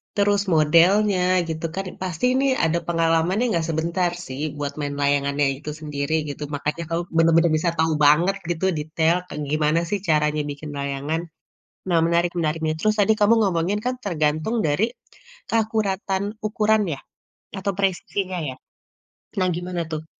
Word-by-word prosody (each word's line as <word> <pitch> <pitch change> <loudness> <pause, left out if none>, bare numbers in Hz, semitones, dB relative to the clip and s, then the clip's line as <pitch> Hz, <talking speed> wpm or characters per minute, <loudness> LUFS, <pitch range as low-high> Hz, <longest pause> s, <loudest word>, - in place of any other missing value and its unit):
terus 205 0 +3
modelnya 180 +6 +4 0.3
gitu 160 0 -4
kan, 195 - -2 0.2
pasti 185 +4 -2
ini 270 +1 +2 0.2
ada 165 +1 +2
pengalamannya 165 +5 +2
nggak 165 -2 0
sebentar 170 +3 0 0.2
sih 130 +2 -6 0.2
buat 145 0 -3
main 145 -1 -3
layangannya 140 0 +2
itu 150 - -7
sendiri 150 0 -3 0.2
gitu. 145 +1 -6
Makanya 150 +4 -3
kamu 165 +1 0 0.2
bener-bener 165 0 +4
bisa 170 +2 +1
tahu 160 0 +3
banget 170 +7 +4 0.2
gitu, 175 +3 -2
detail 160 +2 +1
kayak 150 - -5
gimana 155 +1 +2
sih 205 - 0
caranya 150 -1 +2
bikin 145 +1 -8
layangan. 140 +3 -2 0.7
Nah 170 -2 +2
menarik 170 +1 +2
menarik 160 0 0
nih, 155 0 0
terus 215 +3 +2
tadi 220 +2 +5
kamu 210 +2 +5
ngomongin 180 +4 0
kan 255 0 0
tergantung 155 +3 0
dari 210 +11 +1 0.6
keakuratan 205 -3 0 0.2
ukuran 215 0 +2
ya? 135 - -7 0.6
Atau 200 +1 -1
presisinya 190 0 -1
ya? 130 - -7 0.8
Nah 185 -1 +2
gimana 175 -1 -3
tuh? 155 0 -4
165 Hz, 150 wpm, -23 LUFS, 150-195 Hz, 0.8 s, tadi